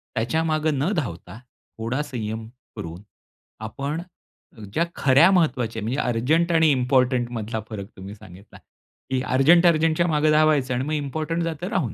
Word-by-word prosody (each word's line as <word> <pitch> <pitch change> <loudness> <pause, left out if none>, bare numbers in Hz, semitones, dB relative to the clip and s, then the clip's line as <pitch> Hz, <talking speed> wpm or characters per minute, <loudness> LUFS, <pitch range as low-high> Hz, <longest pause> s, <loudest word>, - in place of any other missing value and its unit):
त्याच्या 140 +9 0
मागे 155 -1 0
न 145 +7 -1
धावता, 95 - -5 0.4
थोडा 115 +5 -2
संयम 110 -4 -5 0.3
करून 90 -4 -7 0.7
आपण, 140 +8 -4 0.7
ज्या 165 - +2
खऱ्या 140 +7 +5
महत्वाच्या, 125 - +1
म्हणजे 125 +6 -2
अर्जंट 140 +9 +1
आणि 160 -1 +4
इम्पोर्टंट 125 -1 +1
मधला 110 -1 -4
फरक 100 -3 -6
तुम्ही 95 +2 -9
सांगितला. 100 -1 -15 0.5
की 130 -1 0
अर्जंट-अर्जंटच्या 165 +3 +4
मागे 155 -1 +2
धावायचं 150 -4 +3
आणि 125 +1 -1
मग 155 - -3
इम्पोर्टंट 155 +3 -2
जातं 165 +2 -4
राहून. 175 - -1
135 Hz, 140 wpm, -23 LUFS, 115-155 Hz, 0.7 s, खऱ्या